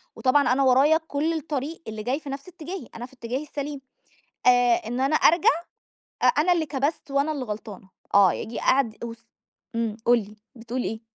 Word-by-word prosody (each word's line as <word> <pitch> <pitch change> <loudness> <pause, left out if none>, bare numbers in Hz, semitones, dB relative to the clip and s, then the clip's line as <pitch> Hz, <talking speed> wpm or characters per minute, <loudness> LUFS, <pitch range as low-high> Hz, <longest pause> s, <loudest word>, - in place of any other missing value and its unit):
وطبعًا 260 0 +3
أنا 275 +2 +2
ورايا 270 +5 +5
كُلّ 305 +3 0
الطريق 310 0 -4
اللي 220 -1 -5
جاي 255 +6 -1
في 290 - -9
نَفس 275 +3 -6
اتجاهي، 355 -4 -8
أنا 235 - -6
في 255 - -17
اتجاهي 250 +2 -4
السليم 290 -1 -5 0.7
آآ، 245 -1 +6
إن 245 +2 -3
أنا 275 +3 +2
أرجَع 330 +2 +5 0.7
أ - - +2
أنا 315 +5 +4
اللي 330 -2 0
كبَست 285 +1 -2
وأنا 280 +3 +1
اللي 280 -4 -4
غلطانة، 210 -3 -7 0.2
آه 200 -3 +6
ييجي 225 - -5
قعد 245 -5 +1
وس 230 0 -9 0.5
إمم، 225 -2 -1
قُل 240 +1 +6
لي، 210 0 -10 0.2
بتقول 240 +2 -4
إيه؟ 220 0 -4
265 Hz, 185 wpm, -25 LUFS, 230-295 Hz, 0.7 s, آآ